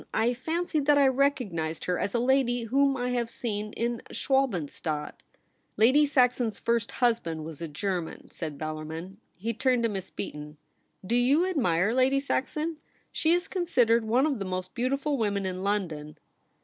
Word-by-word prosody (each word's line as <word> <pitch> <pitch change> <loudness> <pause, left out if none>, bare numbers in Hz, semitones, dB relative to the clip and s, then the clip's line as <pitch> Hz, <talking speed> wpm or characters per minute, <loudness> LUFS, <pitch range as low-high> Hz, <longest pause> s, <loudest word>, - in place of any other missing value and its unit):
I 230 +2 +2
fancied 315 +2 -2
that 295 -1 +6
I 280 -1 +6
recognised 250 - 0
her 180 -1 0
as 200 - -2
a - - +3
lady 245 -1 +2
whom 270 +4 +2
I 250 0 -1
have 240 -2 -1
seen 210 -3 -3
in 235 0 -2
Schwalbenstadt.' 175 - -1 0.3
' - - -44
Lady 270 +7 +5
Saxon's 250 -5 +2
first 230 -1 0
husband 195 -11 0
was 160 -1 -8
a 165 - -3
German,' 175 +2 -4
said 155 -4 -6
Bellarmin. 155 +4 -6 0.2
He 225 +7 -3
turned 250 +1 +1
to 230 - +2
Miss 195 -3 -5
Beaton. 150 0 -7 0.2
' - - -22
Do 230 - 0
you 270 +8 +4
admire 220 - +1
Lady 260 +2 +3
Saxon? 300 +3 -2 0.3
She 320 - +1
is 355 +1 +1
con 365 -3 -2
sidered 235 -6 +4
one 235 +5 +2
of 285 -7 0
the 195 - -3
most 185 0 -4
beautiful 275 +3 -1
women 200 -3 0
in 185 0 -3
London.' 175 -7 -2
235 Hz, 175 wpm, -28 LUFS, 185-265 Hz, 0.3 s, that